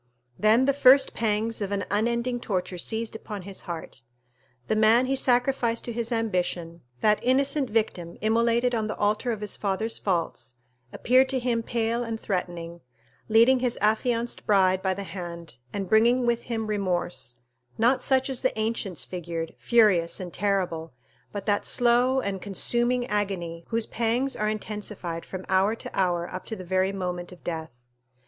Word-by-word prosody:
Then 220 +4 +4
the 280 - +3
first 270 0 +6
pangs 225 0 -1
of 200 -1 -2
an 200 -1 -1
unending 235 +3 0
torture 185 -5 -3
seized 225 +4 -2
upon 210 -3 -7
his 195 0 -8
heart. 165 -7 -6 0.6
The 220 - 0
man 220 +3 +5
he 270 +1 0
sacrificed 245 -2 +1
to 235 - -4
his 230 +1 -2
ambition, 180 -7 -1 0.2
that 210 0 +4
innocent 275 +2 +2
victim 195 -6 -1
immolated 235 +2 +2
on 220 -2 0
the 215 - -3
altar 215 +4 0
of 220 -2 -4
his 210 - -1
father's 215 +3 -2
faults, 170 -9 -2 0.4
appeared 260 +2 +3
to 265 - 0
him 240 -2 0
pale 230 +1 -1
and 225 -1 -4
threatening, 175 -4 -4 0.5
leading 230 +4 +6
his 245 -1 -1
affianced 230 +2 0
bride 190 -2 +4
by 190 -1 0
the 200 - -5
hand, 170 -7 -8
and 195 -2 -3
bringing 235 +5 +4
with 235 0 0
him 225 -2 -1
remorse, 180 - -2 0.4
not 240 +4 +3
such 265 -1 +2
as 265 -3 -1
the 260 - 0
ancients 215 -5 -2
figured, 170 -2 -5
furious 205 -8 +3
and 180 -2 -7
terrible, 180 -7 -1 0.4
but 205 -1 -5
that 205 -1 +1
slow 245 +2 +3
and 200 -6 -3
consuming 240 +5 0
agony 185 -6 -2
whose 230 -1 -1
pangs 235 +4 0
are 215 0 0
intensified 210 -5 -5
from 190 -1 -6
hour 190 +3 +2
to - - -8
hour 175 -2 +1
up 185 - -5
to 220 - -3
the 185 - -8
very 190 +2 +1
moment 180 -2 -4
of 180 - -14
death. 160 -2 -4
215 Hz, 165 wpm, -26 LUFS, 185-235 Hz, 0.6 s, first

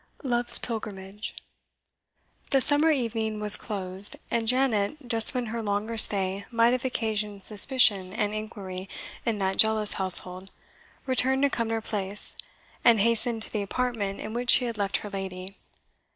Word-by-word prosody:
LOVE'S 240 -2 +6
PILGRIMAGE. 210 -3 -7 1.1
The 275 - +2
summer 290 +4 +5
evening 225 -6 -2
was 210 0 +6
closed, 195 -2 -2 0.2
and 230 -1 -2
Janet, 255 +1 -1
just 230 +2 +7
when 250 -1 -2
her 230 - -4
longer 210 +2 -3
stay 195 -2 +4
might 230 0 +2
have 255 0 -2
occasioned 210 -5 -4
suspicion 210 -4 +2
and 210 0 -3
inquiry 200 -3 -8 0.4
in 225 -2 -1
that 190 -1 -3
zealous 220 -1 0
household, 185 0 -1 0.6
returned 265 +1 +1
to 280 - +2
Cumnor 225 -1 -3
Place, 205 -1 -2 0.5
and 230 -2 +4
hastened 230 +1 -1
to - - -6
the 210 - -2
apartment 205 -2 -4
in 215 - -7
which 240 +1 -4
she 250 - +5
had 230 -3 -6
left 200 -1 -1
her - - -7
lady. 190 0 -7
215 Hz, 150 wpm, -25 LUFS, 200-240 Hz, 1.1 s, just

